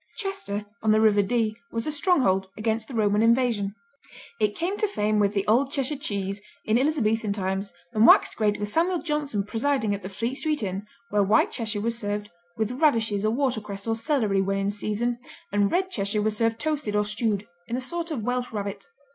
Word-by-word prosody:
Chester 205 - -3 0.2
on 215 - +3
the 215 - +4
River 215 -2 +5
Dee 215 +1 0 0.2
was 230 0 -2
a 305 - -1
stronghold 270 - +2
against 220 0 -1
the 260 - -7
Roman 210 -1 +2
invasion. 230 -4 +2 0.6
It 210 -1 +1
came 355 +4 -1
to 425 - +2
fame 215 - 0
with 205 0 +2
The 200 -2 0
Old 260 +6 +3
Cheshire 280 0 0
Cheese 200 -8 -3 0.2
in 220 +2 +3
Elizabethan 225 -7 +1
times 195 0 -2 0.2
and 220 +1 +5
waxed - - +6
great 210 -2 +1
with 205 - -2
Samuel 340 - +1
Johnson 295 -10 -1
presiding 225 0 0
at 200 - -4
the 190 - -6
Fleet 230 +6 -3
Street 300 -2 -1
Inn 195 +1 -4 0.2
where 205 0 +3
White 205 +3 +3
Cheshire 220 -3 -2
was 230 +1 -1
served 205 0 -3 0.3
"with 225 +5 -2
radishes 225 -9 +2
or 215 - +3
watercress 220 -6 -2
or 225 -1 0
celery 225 -5 +1
when 195 +1 0
in 195 +1 0
season," 215 +4 -1 0.3
and 205 0 +2
Red 375 +1 +1
Cheshire 205 - 0
was 215 0 +1
served 225 +1 +1
toasted 295 -7 -1
or 210 0 +2
stewed 210 -1 -1 0.2
in 235 - -2
a - - -1
sort 335 +6 -3
of 275 -9 -3
Welsh 245 +1 -1
Rabbit. 205 - -4
220 Hz, 200 wpm, -26 LUFS, 205-255 Hz, 0.6 s, waxed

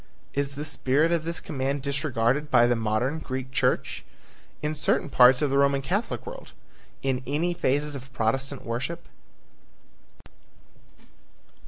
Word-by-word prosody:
Is 140 0 -2
the 150 +2 -5
spirit 150 +2 +1
of 165 -2 0
this 170 +1 -3
command 140 -1 -2
disregarded 140 -1 0
by 120 -3 +6
the 120 0 +3
modern 115 +7 0
Greek 130 -3 -5
church? - - 0 0.6
In 150 +1 0
certain 150 -1 +1
parts 125 +1 +6
of 145 - +1
the 140 - +3
Roman 140 -1 +3
Catholic 195 - -2
world? - - -9 0.5
In 135 -1 0
any 160 +6 0
phases 145 -1 0
of 135 -1 -8
Protestant 130 +3 -1
worship? 125 +8 -3
140 Hz, 135 wpm, -26 LUFS, 130-150 Hz, 0.6 s, by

